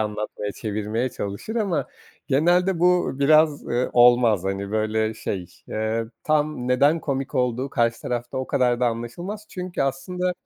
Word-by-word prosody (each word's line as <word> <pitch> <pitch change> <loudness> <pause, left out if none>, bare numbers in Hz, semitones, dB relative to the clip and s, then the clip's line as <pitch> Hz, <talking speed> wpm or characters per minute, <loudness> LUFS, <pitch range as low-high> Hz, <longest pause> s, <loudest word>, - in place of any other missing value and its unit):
anlatmaya, 105 -1 -3
çevirmeye 110 +3 -2
çalışır 105 - -5
ama 195 -8 0 0.4
genelde 175 +6 +3
bu 180 -5 +2
biraz, 155 +1 +4
eee, 125 +1 0
olmaz, 120 -5 +5
hani, 100 +1 -3
böyle, 110 0 0
şey, 95 -4 -4 0.2
eee, 110 +1 -1 0.2
tam 150 -4 0
neden 145 +6 +3
komik 135 -1 -3
olduğu 125 +1 0
karşı 115 -1 +1
tarafta 120 +1 -3
o 130 - -3
kadar 125 -1 +1
da 125 - +3
anlaşılmaz. 175 - -4
Çünkü 180 -5 -4
aslında 180 +7 -1
125 Hz, 145 wpm, -23 LUFS, 110-155 Hz, 0.4 s, olmaz